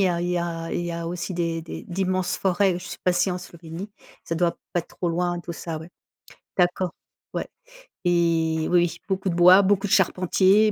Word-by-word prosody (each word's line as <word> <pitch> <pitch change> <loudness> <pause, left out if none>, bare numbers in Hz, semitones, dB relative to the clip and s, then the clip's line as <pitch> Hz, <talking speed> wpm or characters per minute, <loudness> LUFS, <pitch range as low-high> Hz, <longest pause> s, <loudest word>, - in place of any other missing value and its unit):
y 190 - +4
a 170 -1 0
il 175 - -1
y 180 0 +1
a 165 -1 -3
il - - -1
y 175 - -3
a 170 0 -4
aussi 175 +2 -4
des 170 -2 -1
des 165 - -7
d'immenses 185 0 -1
forêts, 190 -1 +2
je 180 - -10
suis - - -7
passée 180 +1 +2
en 180 - -2
Slovénie. 170 +2 -9 0.3
Ça 165 - -3
doit 170 0 +1 0.2
pas 175 - +3
être - - -16
trop 175 - -1
loin, 175 +1 0
tout 170 -1 -7
ça, 165 -1 -5
ouais. 160 +2 -10 0.7
D'accord, 180 -1 +2 0.4
ouais - - -2 0.6
et 165 -2 +2
oui, 175 -2 +3
beaucoup 190 -1 -1
de 170 - -1
bois, 180 +3 +8
beaucoup 200 +1 +2
de - - -6
charpentiers, 190 +2 +4
175 Hz, 205 wpm, -24 LUFS, 170-185 Hz, 0.7 s, bois